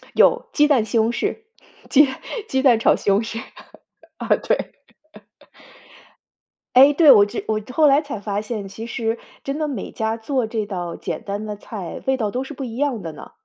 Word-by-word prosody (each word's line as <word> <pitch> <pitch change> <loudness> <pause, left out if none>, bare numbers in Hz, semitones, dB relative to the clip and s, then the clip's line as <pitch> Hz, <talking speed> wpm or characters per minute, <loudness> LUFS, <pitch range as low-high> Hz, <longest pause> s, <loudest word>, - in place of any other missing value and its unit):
有， - - +4
鸡 295 0 +4
蛋 255 -7 +3
西 225 - -3
红 225 +1 +2
柿， 240 - -2 0.5
鸡 290 +1 +6 0.4
鸡 265 0 0
蛋 245 -5 +5
炒 - - +4
西 200 - -1
红 200 +2 +4
柿， 225 0 -5 0.8
啊， - - -6
对。 - - -2 2.0
哎， 270 +3 +7
对， 300 -1 +7
我 205 - +7
这 - - -6
我 215 0 0
后 310 +3 +4
来 280 0 +5
才 275 -8 -6
发 205 0 -2
现， 210 -2 -5
其 220 +4 -8
实 230 0 -2 0.3
真 275 +2 -3
的 305 -1 -1
每 250 -9 -5
家 220 0 -2
做 240 +1 -1
这 220 -1 -3
道 175 -4 -5
简 - - -5
单 200 +1 -4
的 210 -1 -5
菜， 200 -4 -8
味 265 0 +2
道 215 -4 -1
都 255 +5 -3
是 285 - -8
不 270 - -6
一 235 -2 -7
样 265 -7 -1
的 165 -2 -6
呢。 - - -12
230 Hz, 210 characters per minute, -21 LUFS, 210-270 Hz, 2.0 s, 哎